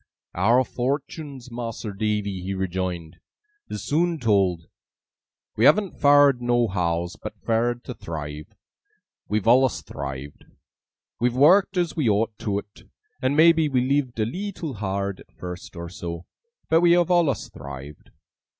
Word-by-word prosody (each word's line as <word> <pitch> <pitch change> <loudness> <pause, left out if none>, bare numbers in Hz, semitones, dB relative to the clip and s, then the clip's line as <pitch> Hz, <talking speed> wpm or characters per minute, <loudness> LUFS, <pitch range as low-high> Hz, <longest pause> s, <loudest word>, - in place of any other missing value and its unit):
'Our 115 +8 +3
fortuns, 135 +1 -4
Mas'r 115 -3 -5
Davy,' 105 -2 -1
he 95 +2 -3
rejoined, 90 -3 -3 0.5
'is 105 - -5
soon 165 +7 +1
told. 95 - +1 0.9
We 110 - +3
haven't 200 +1 +3
fared 145 -3 +6
nohows, 95 -8 0
but - - -7
fared 120 +2 0
to 125 - -6
thrive. 75 -5 -7 0.8
We've 105 -1 -1
allus 130 +2 +4
thrived. 70 +1 -7 0.7
We've 120 0 +1
worked 185 +8 +5
as 170 -5 0
we 145 -8 +1
ought 105 +2 +1
to 100 -2 -1
't, 105 - -21 0.3
and 130 +3 +1
maybe 160 -1 +5
we 130 -3 +2
lived 130 -2 0
a 110 - +2
leetle 180 - -5
hard 100 -2 -3
at - - -17
first 90 +1 -8
or 85 0 -6
so, 85 -1 -7 0.4
but 165 +1 +4
we 170 -1 +6
have 175 0 +3
allus 170 -6 +2
thrived. 70 +1 -10
115 Hz, 140 wpm, -24 LUFS, 95-140 Hz, 0.9 s, fared